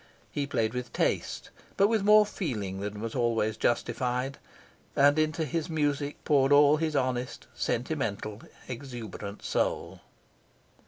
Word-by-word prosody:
He 145 Hz, -1 st, -2 dB
played 110 Hz, -5 st, 0 dB
with 125 Hz, -1 st, -4 dB
taste, -, -, -1 dB, 0.3 s
but 200 Hz, -, +5 dB
with 220 Hz, -1 st, +1 dB
more 210 Hz, +1 st, +7 dB
feeling 105 Hz, -, -3 dB
than 105 Hz, +1 st, -5 dB
was 115 Hz, 0 st, -4 dB
always 115 Hz, -3 st, +1 dB
justified, 125 Hz, +3 st, -1 dB, 0.6 s
and 145 Hz, +2 st, +5 dB
into 155 Hz, +1 st, +1 dB
his 160 Hz, +2 st, -2 dB
music 145 Hz, -2 st, -1 dB
poured 140 Hz, -2 st, +3 dB
all 145 Hz, +1 st, +7 dB
his 155 Hz, -1 st, -1 dB
honest, 130 Hz, -2 st, -1 dB
sentimental, 115 Hz, -5 st, -2 dB, 0.3 s
exuberant 115 Hz, -6 st, -7 dB
soul. -, -, -1 dB
130 Hz, 125 wpm, -29 LUFS, 115-150 Hz, 0.6 s, more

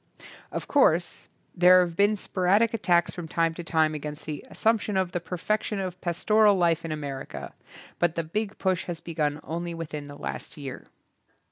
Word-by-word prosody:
Of -, -, -4 dB
course, 175 Hz, -, +2 dB, 0.3 s
there 180 Hz, 0 st, +7 dB
have 175 Hz, -2 st, -2 dB
been 205 Hz, +3 st, +4 dB
sporadic 200 Hz, +4 st, +2 dB
attacks 175 Hz, -5 st, +2 dB
from 175 Hz, -2 st, -6 dB
time 165 Hz, 0 st, +1 dB
to 175 Hz, -, -7 dB
time 160 Hz, -1 st, +2 dB
against 150 Hz, 0 st, -6 dB
the 150 Hz, -2 st, -5 dB
assumption 220 Hz, -3 st, +1 dB
of 185 Hz, -2 st, 0 dB
the 175 Hz, -, -1 dB
perfection 205 Hz, +5 st, -2 dB
of 185 Hz, -1 st, -4 dB
pas 170 Hz, -1 st, -3 dB
toral 215 Hz, -1 st, +6 dB
life 170 Hz, -2 st, +2 dB
in 165 Hz, -, -4 dB
America, 145 Hz, -3 st, -6 dB, 0.5 s
but 175 Hz, -1 st, +2 dB
the 165 Hz, -, -1 dB
big 210 Hz, +6 st, -3 dB
push 185 Hz, -2 st, 0 dB
has 170 Hz, -2 st, -5 dB
begun 155 Hz, -3 st, -2 dB
only 170 Hz, +3 st, -4 dB
within 150 Hz, -3 st, -6 dB
the 145 Hz, 0 st, -10 dB
last -, -, -6 dB
year. 135 Hz, -3 st, -7 dB
175 Hz, 175 wpm, -27 LUFS, 160-190 Hz, 0.5 s, there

